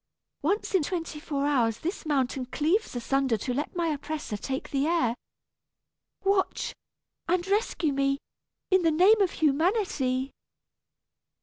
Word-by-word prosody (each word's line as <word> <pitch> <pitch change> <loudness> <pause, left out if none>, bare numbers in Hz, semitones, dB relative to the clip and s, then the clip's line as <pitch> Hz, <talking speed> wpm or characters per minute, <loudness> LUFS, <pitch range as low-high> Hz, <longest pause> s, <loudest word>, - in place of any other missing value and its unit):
Once 395 +10 0
in 380 - +4
twenty 330 -1 -3
four 285 -3 -2
hours 240 -6 +2
this 345 0 -4
mountain 265 -2 0
cleaves 320 - 0
asunder 260 0 +1
to 250 +4 -3
let 290 +7 -3
my 340 -2 0
oppressor 295 -5 -3
take 265 +6 -4
the 280 +1 +1
air. 325 -9 +2 1.1
Watch, 390 -1 +1 0.5
and 350 +1 +1
rescue 395 -7 +1
me, 275 0 +1 0.5
in 375 0 +5
the 330 - +3
name 375 +7 +5
of 385 - +4
humanity." 295 - +1
300 Hz, 130 wpm, -27 LUFS, 270-355 Hz, 1.1 s, in